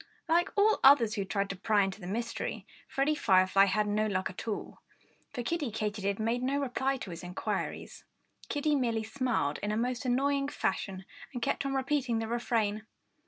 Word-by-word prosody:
Like 340 +2 +3
all 425 +2 +4
others 255 -6 +7
who 200 - -1
tried 200 0 -1
to - - -5
pry 205 +2 +2
into 195 0 -4
the 175 - -7
mystery, 230 +4 -3 0.2
Freddie 275 +3 +1
Firefly 190 -6 +4
had 210 +2 +1
no 210 +1 +1
luck 190 -2 -1
at 185 - -9
all. 215 - -4 0.5
For 245 - -4
Kiddie 300 +1 -1
Katydid 205 -2 -2
made 230 +3 0
no 270 +2 0
reply 270 0 0
to 195 - -7
his 170 - -7
inquiries. 180 +1 -4 0.5
Kiddie 295 +1 +1
merely 230 -5 0
smiled 225 - -1
in 205 - -2
a 215 - 0
most 245 +2 -1
annoying 275 +2 +1
fashion 190 -8 -2 0.3
and 245 - -4
kept 275 +1 0
on 270 - -2
repeating 265 -3 0
the 225 0 -2
refrain. 220 -2 -1
230 Hz, 180 wpm, -30 LUFS, 205-270 Hz, 0.5 s, others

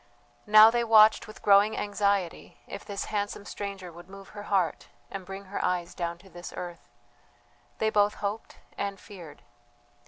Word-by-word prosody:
Now 215 +1 +9
they 240 0 +1
watched 220 -1 +5
with 215 - -13
growing 205 +1 +5
anxiety 200 -3 -1
if - - -8
this 200 -1 -5
handsome 205 0 -3
stranger 195 -4 -6
would 175 +2 -14
move 195 0 -12
her 205 - -9
heart 185 -6 0 0.2
and 190 -2 -7
bring 195 +1 -7
her 195 +2 -4
eyes 175 -1 -1
down 170 -1 -4
to - - -15
this 175 +1 -9
earth. 175 -1 -8 0.9
They 220 0 0
both 205 0 +3
hoped 210 +2 -5 0.2
and 200 -1 -3
feared. 175 -8 -12
200 Hz, 160 wpm, -28 LUFS, 180-210 Hz, 0.9 s, Now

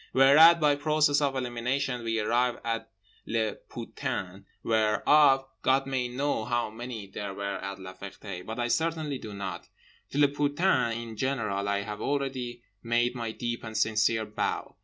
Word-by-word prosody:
Whereat, 155 +6 +8
by 150 -2 +3
process 150 -1 +2
of 140 -2 +1
elimination, 125 0 -2
we 115 -1 0
arrive 120 +3 +1
at 115 -1 -3 0.4
les 110 -1 0 0.2
putains, 95 +1 -5 0.2
whereof 135 +6 +4 0.2
God 135 +1 +3
may 130 -2 -1
know 130 -1 -1
how 120 -1 -1
many 115 -1 -6
there 100 0 -6
were 100 -1 -3
at 100 0 -5
La 95 -1 -9
Ferté, 95 -1 -8
but 110 +4 -6
I 120 - 0
certainly 155 -1 -1
do 110 - -8
not. 95 -3 -6 0.4
To - - -5
les 145 -1 +4
putains 145 -4 +2
in 115 -1 -7
general 105 -6 -1
I 100 0 +1
have 105 0 -6
already 130 -4 -2 0.2
made 120 +1 +1
my 115 -3 -4
deep 120 0 -4
and 110 -1 -5
sincere 110 0 +2
bow. 105 0 -3
120 Hz, 160 wpm, -28 LUFS, 110-135 Hz, 0.4 s, Whereat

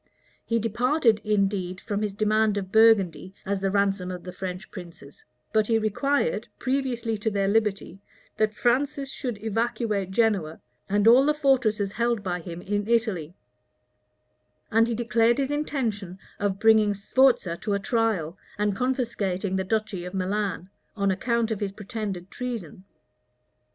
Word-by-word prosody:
He 230 - 0
departed, 230 +1 +2
indeed, 195 -3 0
from 205 -1 -3
his 210 -2 -2
demand 215 0 +2
of 190 -1 -4
Burgundy 200 -5 +4
as 200 0 -1
the 195 - +1
ransom 195 -2 +1
of 180 -1 -6
the 180 - -7
French 185 +1 -6
princes; 170 -6 -11 0.3
but 215 -1 +3
he 225 - +3
required, 280 - 0
previously 255 -4 -1
to 220 - 0
their 200 -2 0
liberty, 200 -3 0 0.4
that 215 0 +2
Francis 275 +3 0
should 245 -6 -4
evacuate 220 -3 -1
Genoa, 190 -7 +1 0.3
and 205 +2 +2
all 245 +4 +8
the 300 +1 +2
fortresses 245 -9 +2
held 235 -1 0
by 180 -2 -2
him 170 0 -8
in 205 +1 -2
Italy; 215 -9 0 1.4
and 225 +1 +4
he 235 - -1
declared 230 0 +2
his 275 0 -1
intention 230 -11 -2 0.2
of 200 -2 0
bringing 215 -2 +4
Sforza 205 -3 +2
to 205 - -2
a 200 - +1
trial, 205 -7 0 0.2
and 205 -1 0
confiscating 205 -6 -1
the 190 - 0
duchy 215 -2 -2
of 180 +2 -7
Milan, 190 -1 -2 0.3
on 200 -1 +2
account 230 +4 0
of 215 - -2
his 200 -2 -3
pretended 205 -4 -5
treason. 225 -8 -5
210 Hz, 150 wpm, -26 LUFS, 195-235 Hz, 1.4 s, all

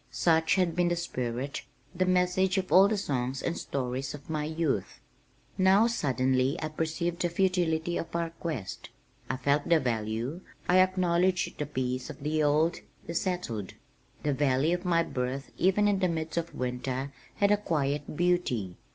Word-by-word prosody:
Such 160 -1 +2
had 180 -4 +1
been 175 0 +2
the 175 - +1
spirit, 130 -4 -3 0.3
the 185 +1 0
message 185 +1 +2
of 185 -1 -2
all 190 +2 +8
the 215 0 0
songs 130 -6 -2
and 170 - -1
stories 135 +1 -3
of 145 +3 -10
my 150 -1 -1
youth. 155 - -2 0.6
Now 190 +4 +5
suddenly 130 - +1
I 155 - -3
perceived 165 +2 -2
the 175 - +2
futility 175 -2 +1
of 165 - -5
our 170 -1 -1
quest. 155 - -5 0.4
I - - -1
felt 140 +3 +1
the 170 -1 +5
value, 115 +5 -2 0.3
I 180 +1 +5
acknowledged 185 -1 +2
the 150 - -2
peace 130 -2 -2
of 140 -2 -9
the 155 +1 0
old, 155 +3 +3 0.3
the 170 - -5
settled. 165 - -2 0.5
The 145 - +1
valley 140 +3 +2
of 180 +1 -3
my 170 -2 +3
birth 130 0 -3
even 195 +3 +3
in 200 -2 +2
the 185 - +2
midst 160 -2 -3
of 170 0 -3
winter 125 +2 -3 0.2
had 200 0 +3
a 210 - +5
quiet 150 -6 -2
beauty. 150 - 0
160 Hz, 170 wpm, -29 LUFS, 135-180 Hz, 0.6 s, all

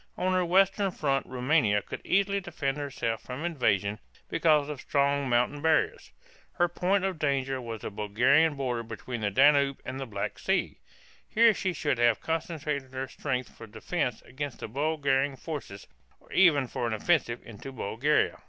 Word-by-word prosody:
On 185 0 0
her 185 0 +2
western 195 +3 +3
front 140 -6 -1
Roumania 125 -5 +2
could - - -7
easily 200 +1 +2
defend 160 -7 -3
herself 130 -6 -3
from 130 +6 -6
invasion 105 - 0 0.3
because 155 -3 +3
of 150 -3 -6
strong 140 -1 +1
mountain 125 +4 +1
barriers. 160 0 +1 0.4
Her 175 -1 +2
point 185 +3 0
of 190 -4 -2
danger 135 -3 0
was 115 -2 -6
the - - -5
Bulgarian 125 +10 +3
boundary 125 -4 -2
between 115 +1 -6
the 105 - +1
Danube 140 +4 +4
and 130 +1 -5
the 135 - -5
Black 110 - -4
Sea. - - -1 0.5
Here 230 0 +5
she 190 - -1
should 145 -6 -1
have 120 -2 +4
concentrated 150 -5 -3
her 130 0 -3
strength 130 -2 -4
for 115 - -11
defense 120 +3 -3
against 140 0 -6
the - - -4
Bulgarian 140 +1 0
forces 130 -9 -7 0.3
or - - -23
even 155 -8 +5
for 120 -1 -3
an 115 - -2
offensive 120 0 +1
into 115 +4 -9
Bulgaria. 130 +5 0
140 Hz, 165 wpm, -28 LUFS, 120-160 Hz, 0.5 s, Here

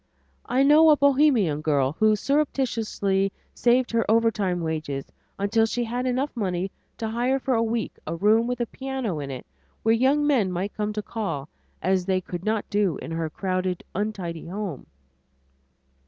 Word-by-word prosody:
I 260 +2 +3
know 305 +3 +7
a 300 - +6
Bohemian 265 - +3
girl 140 -4 +2
who 215 +5 +3
surreptitiously 225 -7 0 0.2
saved 245 +1 +2
her 230 -1 +2
overtime 215 -5 +2
wages 155 -4 -3 0.3
until 225 +3 +2
she 240 +2 -1
had 245 +2 -2
enough 255 +3 -1
money 190 -4 -2 0.3
to 225 - -3
hire 240 +4 +1
for 265 0 -1
a 230 - +2
week 230 0 -2
a - - -2
room 215 +6 +3
with 250 0 -2
a - - +1
piano 260 - -4
in 140 -1 -5
it 130 -2 -6 0.4
where 225 - +4
young 270 +5 +3
men 245 -11 +2
might 185 +3 -3
come 210 0 -2
to 210 0 -3
call, 165 -12 -4 0.3
as 185 +1 +1
they 190 -1 +2
could 180 -1 -7
not 215 0 -1
do 200 -7 +1
in - - -7
her 165 -1 -2
crowded 185 +1 -2
untidy 185 -6 -3
home. 190 -5 -5
215 Hz, 170 wpm, -25 LUFS, 180-245 Hz, 0.4 s, know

